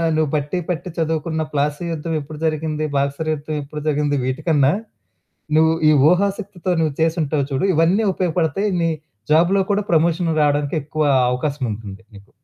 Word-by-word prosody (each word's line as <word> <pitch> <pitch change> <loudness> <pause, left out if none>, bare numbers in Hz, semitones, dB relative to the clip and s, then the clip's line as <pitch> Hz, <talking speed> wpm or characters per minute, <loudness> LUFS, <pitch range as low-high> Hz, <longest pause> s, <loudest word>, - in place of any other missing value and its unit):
నువ్వు 155 -1 +1
బట్టి 150 +4 -1
పట్టి 180 +1 -3
చదువుకున్న 160 0 -1
'ప్లాసీ' 145 +4 -1
యుద్ధం 165 +1 -3
ఎప్పుడు 150 +1 -9
జరిగింది, 155 -1 -1
'బక్సర్' 140 +3 -1
యుద్ధం 155 +1 -5
ఎప్పుడు 150 +2 -7
జరిగింది 145 -1 +1
వీటికన్నా, 135 +2 +2 0.9
నువ్వు 160 +1 +5 0.2
ఈ - - +7 0.2
ఊహాశక్తితో 195 0 -1
నువ్వు 155 -3 0
చేసుంటావు 155 -3 +1
చూడు 135 +7 0
ఇవన్నీ 175 +7 +3
ఉపయోగపడతాయి, 180 +2 0
నీ 165 - +2 0.4
జాబ్‌లో 175 +5 +4
కూడా 205 0 0
ప్రమోషన్ 170 +1 +2
రావడానికి 145 +1 +1
ఎక్కువ 155 +2 -3 0.3
అవకాశముంటుంది 115 -7 -4
నీకు. 100 0 -15
155 Hz, 140 wpm, -20 LUFS, 145-170 Hz, 0.9 s, ఈ